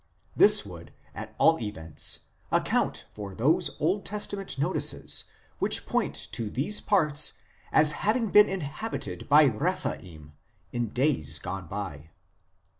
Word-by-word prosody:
This - - +6
would, - - -11 0.2
at - - -8
all 160 0 +4
events, 80 -8 -2 0.3
account - - 0
for 100 -2 -8
those 135 +8 +1
Old 185 +7 0
Testament 200 -5 -5
notices 150 +7 0 0.3
which - - +3
point - - -1 0.2
to 110 -2 -3
these 150 - -1
parts 150 -7 +2 0.4
as 150 -1 +6
having 220 +4 0
been 210 0 +7
inhabited 185 +4 -5
by 150 +2 +7
Rephaim 105 - -2 0.4
in 120 -2 -2
days 120 - +1
gone 90 +3 -6
by. 80 -6 -6
145 Hz, 120 wpm, -27 LUFS, -, 0.4 s, been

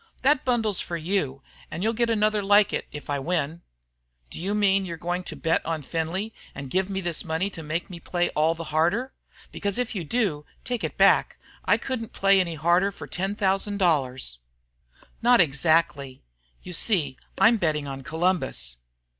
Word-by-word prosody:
"That 275 0 +4
bundle's 225 -6 +1
for 170 - -3
you, 155 -6 -2 0.3
and 170 +4 -5
you'll 225 +1 +1
get 235 +1 +1
another 215 -1 +2
like 205 +1 +4
it - - -2
if 150 - -8
I 145 -1 -1
win." 165 +1 -2 0.7
"Do - - -6
you 200 +4 -1
mean 195 -2 +3
you 170 -3 -5
are - - -13
going 175 +2 -2
to - - -5
bet 165 0 0
on 160 -2 -3
Findlay 170 +9 -3 0.2
and 140 -2 -7
give 190 +1 +1
me 195 -1 -2
this 175 -3 -1
money 165 +4 -1
to 170 - -8
make 160 +3 -3
me 175 -2 -9
play 175 +1 -1
all 160 +2 +2
the 165 - -6
harder? 200 +12 +1 0.4
Because, 200 0 -2
if 245 -1 -1
you 190 -5 -3
do, 175 -5 0 0.2
take 245 -2 -3
it - - -3
back. - - +4 0.3
I - - +4
couldn't 240 -4 -5
play 195 0 +4
any 170 -3 0
harder 175 +5 +2
for - - -9
ten 195 +3 -3
thousand 200 0 0
dollars." 130 - 0 0.8
"Not 245 +1 +5
exactly. 150 - +1 0.4
You 180 - -8
see 165 - +1 0.2
I'm 230 +1 +5
betting 155 -6 0
on 135 -1 -6
Columbus." 160 - -1
180 Hz, 185 wpm, -25 LUFS, 155-205 Hz, 0.8 s, Not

